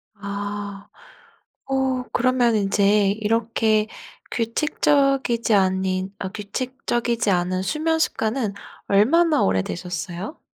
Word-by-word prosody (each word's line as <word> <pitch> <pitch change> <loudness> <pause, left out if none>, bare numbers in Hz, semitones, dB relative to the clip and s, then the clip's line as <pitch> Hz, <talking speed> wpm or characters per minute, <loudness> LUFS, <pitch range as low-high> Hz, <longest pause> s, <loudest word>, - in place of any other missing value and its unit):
아. 200 0 -6 0.8
어 265 -1 +1
그러면 245 -2 +2
인제 200 0 +3
이렇게 220 0 +1 0.5
규칙적이지 260 -1 +1
아닌 190 0 +1
아 190 - -3
규칙적이지 235 +1 -2
않은 185 +1 0
수면 320 +8 0
습관은 220 -6 0 0.3
얼마나 300 +12 +4
오래되셨어요? 175 - -3
215 Hz, 220 characters per minute, -23 LUFS, 195-255 Hz, 0.8 s, 얼마나